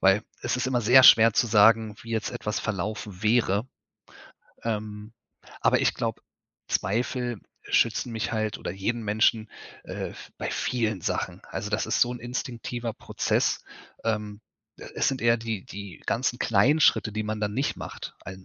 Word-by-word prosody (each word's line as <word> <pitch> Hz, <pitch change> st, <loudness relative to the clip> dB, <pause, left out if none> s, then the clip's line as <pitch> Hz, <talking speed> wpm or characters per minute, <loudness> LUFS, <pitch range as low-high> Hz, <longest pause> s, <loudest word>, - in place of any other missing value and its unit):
weil 95 Hz, +2 st, +4 dB, 0.2 s
es 120 Hz, +1 st, 0 dB
ist 125 Hz, -, -1 dB
immer 130 Hz, -2 st, +1 dB
sehr 125 Hz, +4 st, +7 dB
schwer 115 Hz, -2 st, +8 dB
zu 120 Hz, -, +2 dB
sagen, 110 Hz, 0 st, +5 dB
wie 115 Hz, -, -10 dB
jetzt 110 Hz, -2 st, -1 dB
etwas 105 Hz, +1 st, -3 dB
verlaufen 105 Hz, -1 st, -4 dB
wäre, 110 Hz, 0 st, +2 dB, 1.0 s
ähm, 105 Hz, -1 st, -4 dB, 0.5 s
aber -, -, +3 dB
ich -, -, +2 dB
glaube, -, -, -3 dB, 0.5 s
Zweifel 120 Hz, +1 st, -1 dB, 0.2 s
schützen 115 Hz, +1 st, +1 dB
mich 115 Hz, +1 st, -3 dB
halt 110 Hz, -2 st, -1 dB
oder -, -, -5 dB
jeden 110 Hz, +5 st, -2 dB
Menschen, 110 Hz, +1 st, +2 dB, 0.4 s
äh, -, -, -5 dB
v -, -, -12 dB
bei -, -, -3 dB
vielen 110 Hz, -5 st, -1 dB
Sachen. -, -, -3 dB
Also, 105 Hz, +2 st, -5 dB
das 110 Hz, +1 st, 0 dB
ist -, -, 0 dB
so 120 Hz, -, +3 dB
'n 125 Hz, -, -6 dB
instinktiver 120 Hz, -1 st, -4 dB
Prozess. -, -, -1 dB, 0.4 s
Ähm, 105 Hz, -2 st, -2 dB, 0.4 s
äh, -, -, -9 dB
es -, -, +2 dB
sind 135 Hz, -, -2 dB
eher 115 Hz, 0 st, +4 dB
die 115 Hz, -4 st, -4 dB
die 100 Hz, -2 st, -9 dB
ganzen 120 Hz, +1 st, 0 dB
kleinen 120 Hz, +9 st, +3 dB
Schritte, 110 Hz, -, +4 dB
die 110 Hz, +1 st, -2 dB
man 105 Hz, 0 st, -3 dB
dann 105 Hz, -1 st, -1 dB
nicht 135 Hz, +4 st, -1 dB
macht. -, -, -8 dB
Einen, 95 Hz, 0 st, -9 dB
110 Hz, 170 wpm, -26 LUFS, 105-120 Hz, 1.0 s, schwer